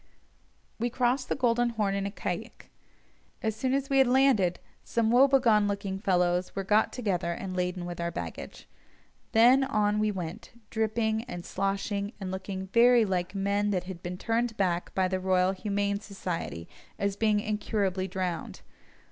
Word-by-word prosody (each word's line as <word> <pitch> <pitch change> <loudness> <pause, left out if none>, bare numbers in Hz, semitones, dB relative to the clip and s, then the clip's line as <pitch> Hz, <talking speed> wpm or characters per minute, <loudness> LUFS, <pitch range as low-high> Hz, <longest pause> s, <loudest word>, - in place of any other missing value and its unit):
We 240 +2 0
crossed 250 +2 0
the - - +1
Golden 240 -2 +2
Horn 210 -4 -1
in 200 0 -1
a - - -3
caïque. 200 - -6 0.7
As 220 -1 0
soon 255 +4 0
as 275 0 -1
we 275 -1 +2
had 265 - +5
landed, 245 -9 +3 0.2
some 230 -1 0
woebegone 245 -5 +5
looking 200 -1 -3
fellows 180 -2 +1
were 195 - -2
got 210 +3 +3
together 185 -8 -1
and 185 +1 -6
laden 180 0 -2
with 175 -1 -5
our 170 - -1
baggage. 170 - -7 0.6
Then 245 +4 +6
on 210 -5 +1
we 215 0 +2
went, 190 +5 -7
dripping, 220 0 0
and 175 -5 -7
sloshing, 200 +2 -2
and 190 -2 -4
looking 190 0 -5
very 235 0 +6
like 185 -1 -2
men 200 +1 0
that 185 -3 0
had 180 -2 -8
been 180 0 -5
turned 230 +2 -1
back 180 -3 0
by 190 -1 +2
the 185 0 -1
Royal 185 0 +2
Humane 200 +1 -1
Society 180 - -5 0.3
as 200 -1 -1
being 210 0 +2
incurably 205 -3 -1
drowned. 185 -2 -4
200 Hz, 165 wpm, -28 LUFS, 185-225 Hz, 0.7 s, Then